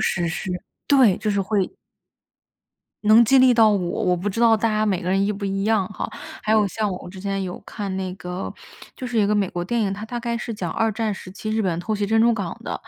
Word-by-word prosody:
史 175 -2 0
诗， 175 +3 -4 0.4
对， 255 -10 +5
就 215 - -1
是 200 - 0
会 195 0 0 1.3
能 215 +3 +7
激 265 +4 +5
励 255 -1 +6
到 225 -2 +6
我， 205 - +2 0.3
我 180 -1 +3
不 185 +4 -2
知 215 +4 -3
道 230 -1 +6
大 225 +2 +1
家 215 0 +1
每 190 -4 0
个 180 - -3
人 195 +1 +2
一 205 - 0
不 200 0 -6
一 195 0 -1
样 215 -3 +2
哈。 210 - -4 0.4
还 215 - +1
有 215 -2 +4
像 215 +1 -2
我 180 -1 -6
之 190 +1 -11
前 195 0 -2
有 180 -1 -5
看 200 -4 -5
那 185 -1 -3
个， 180 +1 -5 0.4
就 255 - -6
是 245 -2 -1
一 205 - +4
个 210 - +2
美 200 -3 +1
国 175 0 -4
电 235 +6 -1
影， 200 -3 0
它 205 +2 -6
大 240 +2 -5
概 235 0 -2
是 235 0 -4
讲 180 -6 -4
二 225 -1 +1
战 220 -1 -1
时 185 - -9
期 215 +3 -6
日 220 0 +1
本 175 -3 0
偷 215 +5 -2
袭 205 -1 -1
珍 220 +1 +3
珠 235 +1 +5
港 195 -6 -4
的， - - -4
205 Hz, 280 characters per minute, -23 LUFS, 190-225 Hz, 1.3 s, 能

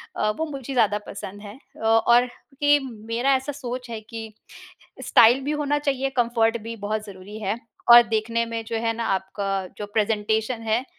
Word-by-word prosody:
अ, 215 - +1
वो 320 - -1
मुझे 275 -3 -6
ज़्यादा 215 -4 +3
पसंद 205 0 -8
है। 205 +1 -9
अ, - - -22
और 235 +2 +5 0.4
के 290 0 +6
मेरा 230 +4 -1
ऐसा 265 +3 -2
सोच 250 -2 -6
है 225 -1 -5
कि 220 0 -8 0.7
स्टाइल 240 +4 +6
भी 290 - -1
होना 295 -1 0
चाहिए, 270 -2 -1
कम्फर्ट 235 -1 +2
भी 230 +1 -6
बहुत 215 +1 -2
ज़रूरी 200 +2 -10
है 210 +2 -2 0.3
और 240 0 +11
देखने 230 +1 0
में 230 -1 -4
जो 225 0 -3
है 230 0 0
ना 230 - -2
आपका 190 +2 -4 0.3
जो 210 - -4
प्रेजेंटेशन 220 +2 0
है 225 +4 0
230 Hz, 180 wpm, -24 LUFS, 215-250 Hz, 0.7 s, और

